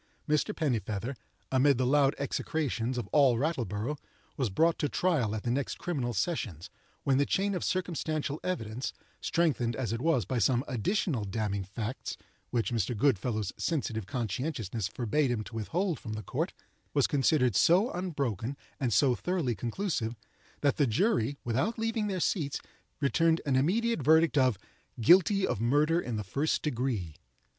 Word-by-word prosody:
Mr. 150 +7 +2
Pennifeather, 115 - -1 0.4
amid 135 0 +4
the 130 - +1
loud 140 +1 +4
execrations 130 -3 -2
of 120 - -2
all 135 -5 +4
Rattleborough, 125 - -2 0.4
was 130 -5 0
brought 165 - +2
to 145 - 0
trial 135 - +1
at 110 - -4
the 120 - 0
next 135 +2 -1
criminal 140 -9 -2
sessions, 100 - -2 0.3
when 135 -1 +3
the 145 - +3
chain 200 +1 +1
of 180 - -2
circumstantial 155 -5 -1
evidence 120 -8 -3 0.3
(strengthened 135 -9 +1
as 115 -4 -2
it 115 - -3
was 140 - +2
by 125 +5 -1
some 120 +4 +3
additional 130 - 0
damning 100 -1 -2
facts, 110 +6 -5 0.3
which 120 0 0
Mr. 115 0 -1
Goodfellow's 110 -5 +1
sensitive 115 - -2
conscientiousness 115 - -2
forbade 125 +7 0
him 115 -3 -1
to 115 - -11
withhold 165 - -1
from 110 - -6
the 110 0 -5
court) - - -2 0.4
was - - +4
considered 135 - +2
so 185 - +4
unbroken 140 - -2 0.2
and 130 -5 0
so 125 +6 +4
thoroughly 170 -3 -1
conclusive, 120 - -2 0.5
that 140 -1 +2
the 145 - +3
jury, 140 - +1
without 135 - 0
leaving 225 -1 -1
their 190 -2 -2
seats, 155 -5 0 0.4
returned 160 +4 +3
an 140 -3 +1
immediate 225 - +2
verdict 160 +1 +4
of 130 -6 +3 0.4
"Guilty 190 - +5
of 105 - -2
murder 150 +7 +3
in 120 -7 -4
the 105 - -2
first 140 +11 -1
degree." 120 - -2
130 Hz, 155 wpm, -30 LUFS, 115-160 Hz, 0.5 s, Guilty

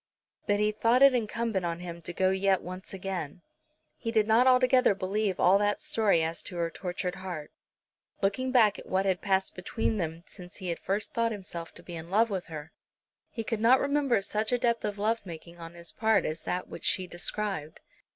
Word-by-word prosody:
But 205 0 +2
he 210 0 +2
thought 230 +4 +3
it 275 -1 +8
incumbent 230 -4 -1
on 170 -1 -2
him 170 -1 -7
to 175 - -5
go 185 +2 +2
yet 190 0 +2
once 185 +1 -7
again. 180 -4 -5 0.5
He 230 - -4
did 220 -2 +3
not 225 +4 +4
altogether 255 -3 +5
believe 195 0 -1
all 190 +3 +5
that 205 0 +1
story 220 - +2
as 165 +1 -1
to 180 - -7
her 170 -1 -1
tortured 180 0 -4
heart. 180 -6 -6 0.7
Looking 255 +7 0
back 220 -5 +4
at - - -11
what 190 +1 +1
had 190 -2 +1
passed 190 -1 +1
between 220 +4 -2
them 165 -2 -3
since 180 0 -10
he 185 -3 -5
had 170 - -2
first 200 +2 -2
thought 230 -1 +1
himself 180 -5 -6
to 170 - -12
be 175 - -8
in 165 +1 -7
love 220 +4 +3
with 190 -3 -3
her, 155 -2 -8 0.6
he 225 - -5
could 220 -1 -2
not 250 +3 +6
remember 280 -7 +1
such 215 +3 -1
a 245 - +3
depth 235 -1 +1
of 205 -1 -3
love 220 +3 0
making 170 -1 -10
on 165 0 -9
his 170 0 -6
part 220 0 +2
as 155 +1 -3
that 180 0 -3
which - - -9
she 185 - +2
described. 175 -3 -3
195 Hz, 210 wpm, -29 LUFS, 175-225 Hz, 0.7 s, it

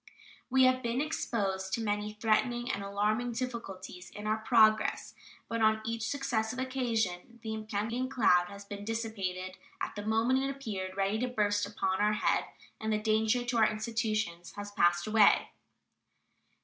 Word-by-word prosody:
We 260 0 +5
have 255 0 +4
been 235 0 -1
exposed 200 -10 -2
to 230 - 0
many 210 0 -1
threatening 240 +3 +1
and 200 - -3
alarming 210 +4 0
difficulties 195 -7 -6
in 210 - -9
our 215 +1 +1
progress, 220 -1 +3 0.3
but 230 0 -2
on 220 0 +4
each 225 0 -2
successive 245 -3 -1
occasion 235 -6 -1
the 220 -1 -3
impending 220 +4 -2
cloud 180 -9 +4
has 200 +1 -10
been 200 0 -7
dissipated 195 -5 -3 0.2
at - - -3
the 205 - -4
moment 225 +4 +2
it 270 +1 -1
appeared 205 -9 -5
ready 195 +2 +1
to 250 - 0
burst 205 -4 +1
upon 190 -2 -1
our 210 0 +3
head, 210 - +1 0.3
and 220 0 -2
the 215 - +2
danger 220 +3 +1
to 240 -1 -1
our 220 -1 +5
institutions 215 -5 -2
has 205 0 -7
passed 175 -3 +3
away. 215 -1 +5
220 Hz, 160 wpm, -31 LUFS, 205-235 Hz, 0.3 s, We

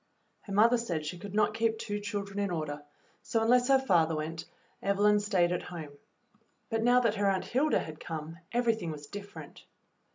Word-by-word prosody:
Her 200 - -11
mother 230 +4 +5
said 170 -10 -3
she 175 +3 -5
could 200 +2 -8
not 210 0 +3
keep 225 0 +1
two 205 -2 -3
children 205 -1 -4
in 200 0 0
order, 155 -4 -3 0.4
so 225 -1 0
unless 245 +2 +4
her 270 -1 +6
father 170 -11 +2
went 155 +1 -4 0.4
Evelyn 205 +1 +3
stayed 190 -4 +2
at 180 - -1
home; 160 -5 -8 0.8
but 225 0 +1
now 245 +2 +5
that 230 -4 +2
her 200 -1 +2
Aunt 190 -1 0
Hilda 290 +5 +2
had 155 -1 -5
come, 160 +1 -6
everything 230 -7 +1
was 150 -2 -7
different. 200 +6 -10
200 Hz, 185 wpm, -30 LUFS, 165-225 Hz, 0.8 s, her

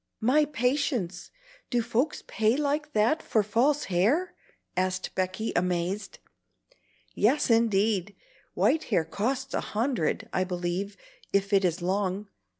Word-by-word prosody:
"My 275 +7 +4
patience! 250 - -1 0.4
do 240 -2 +1
folks 240 +6 -1
pay 220 +3 +1
like 300 +1 -1
that 225 +9 +2
for 215 - +1
false 250 +8 +2
hair?" 220 - +1 0.4
asked 185 0 -1
Becky, 185 +4 -2
amazed. 180 +3 -1 1.0
"Yes, 250 +4 +2
indeed. 210 -3 +2 0.4
White 320 - +2
hair 165 - +1
costs 255 - -2
a - - 0
hundred, 230 -1 -1
I 185 - +2
believe, 180 +2 -3 0.3
if 200 +1 +1
it 195 0 +5
is 175 -1 0
long. 195 +2 -1
210 Hz, 125 wpm, -27 LUFS, 185-255 Hz, 1.0 s, it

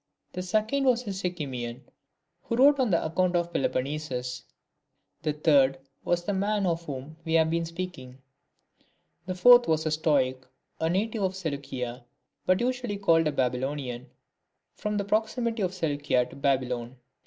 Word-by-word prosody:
The 180 - -3
second 215 +9 0
was 250 -1 +3
a 205 - -3
Sicymian, 135 -10 -4 0.6
who 230 - -1
wrote 280 +3 +6
an 250 -5 +2
account 175 +2 +1
of 170 0 0
Peloponnesus. 130 -3 -2 0.8
The 155 - 0
third 140 -3 +4 0.3
was 175 0 0
the 205 - 0
man 200 +1 0
of 170 -1 0
whom 140 +2 -7
we 160 -1 -3
have 160 0 +4
been 170 0 0
speaking. 165 -7 -7 1.1
The 185 - -2
fourth 245 +5 +7
was 160 0 +1
a 155 - 0
Stoic, 145 -5 +1 0.4
a 160 - +1
native 215 +5 0
of 190 -1 0
Seleucia, 135 -8 -4 0.4
but 185 +3 +3
usually 245 -4 -1
called 165 -5 +3
a - - +1
Baby 125 -3 0
lonian, 130 -2 -4 0.7
from 210 0 -3
the 200 - -1
proximity 225 +2 0
of 185 -2 0
Seleucia 145 -8 0
to - - -11
Babylon. 130 -3 -1
165 Hz, 155 wpm, -27 LUFS, 135-200 Hz, 1.1 s, fourth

